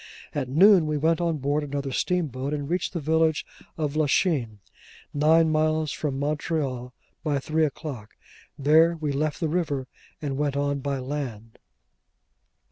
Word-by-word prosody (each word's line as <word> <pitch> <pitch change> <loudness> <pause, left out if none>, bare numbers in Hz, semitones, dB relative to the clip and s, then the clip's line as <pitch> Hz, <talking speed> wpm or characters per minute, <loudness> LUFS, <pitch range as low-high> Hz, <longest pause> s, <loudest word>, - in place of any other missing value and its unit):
At 135 -4 -2
noon 180 +3 +6
we 150 0 0
went 160 +3 +2
on 165 -2 0
board 145 +2 0
another 140 -1 -3
steamboat, 145 -4 -1
and 145 -1 -4
reached 180 +4 -1
the 170 - -2
village 160 +1 +1 0.3
of 150 -2 -2
Lachine, 145 - +1 0.6
nine 160 +2 +4
miles 155 0 +1
from 140 -3 -3
Montreal, 140 -3 -2 0.3
by 150 -3 +1
three 155 +3 +1
o'clock. 135 -7 -6 0.4
There, 160 +4 +5
we 150 -2 -1
left 150 +2 -1
the 165 - 0
river, 150 -5 -1 0.3
and 140 -3 -3
went 145 -1 0
on 140 0 0
by 140 0 -2
land. 125 -5 -5
150 Hz, 145 wpm, -25 LUFS, 140-160 Hz, 0.6 s, noon